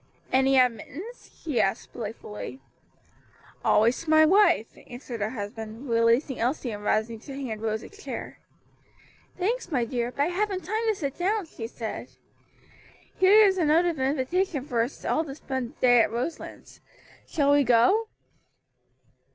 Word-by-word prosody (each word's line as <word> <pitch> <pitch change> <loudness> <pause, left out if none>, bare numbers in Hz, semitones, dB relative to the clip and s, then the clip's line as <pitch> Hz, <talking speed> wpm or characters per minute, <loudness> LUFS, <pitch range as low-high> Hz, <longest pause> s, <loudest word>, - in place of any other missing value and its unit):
"Any 265 +1 +4
admittance?" 255 - -1
she 280 -9 +1
asked 195 - -2
playfully. 220 +2 -7 1.0
"Always 230 +3 +3
to 325 - -8
my 315 0 +7
wife," 375 - +3
answered 245 -2 -8
her 210 - 0
husband, 220 +2 -7
releasing 230 +4 +2
Elsie 245 +1 -1
and 205 -1 -7
rising 220 +2 0
to 270 +4 -9
hand 225 -6 -5
Rose 220 -1 -2
a - - -10
chair. 415 0 -8 1.0
"Thanks, 415 +2 -2
my 250 -5 +1
dear, 240 0 -2
but 280 - 0
I - - +1
haven't 385 +1 -1
time 435 +4 -1
to 435 - +2
sit 280 -5 -5
down," 400 +2 0
she 225 -7 -7
said. 230 -2 -6 1.1
"Here 410 +3 +7
is 380 -2 +2
a 335 - +2
note 320 +4 +4
of 335 -5 -1
invitation 280 +3 0
for 240 -5 0
us 240 +5 -4
all 315 - +1
to 275 -4 -8
spend 260 -3 -5
the - - -33
day 245 -2 +6
at - - +1
Roselands. 245 +8 -6 0.5
Shall 285 -3 +2
we 285 0 +5
go?" 250 - +4
265 Hz, 160 wpm, -26 LUFS, 230-340 Hz, 1.1 s, my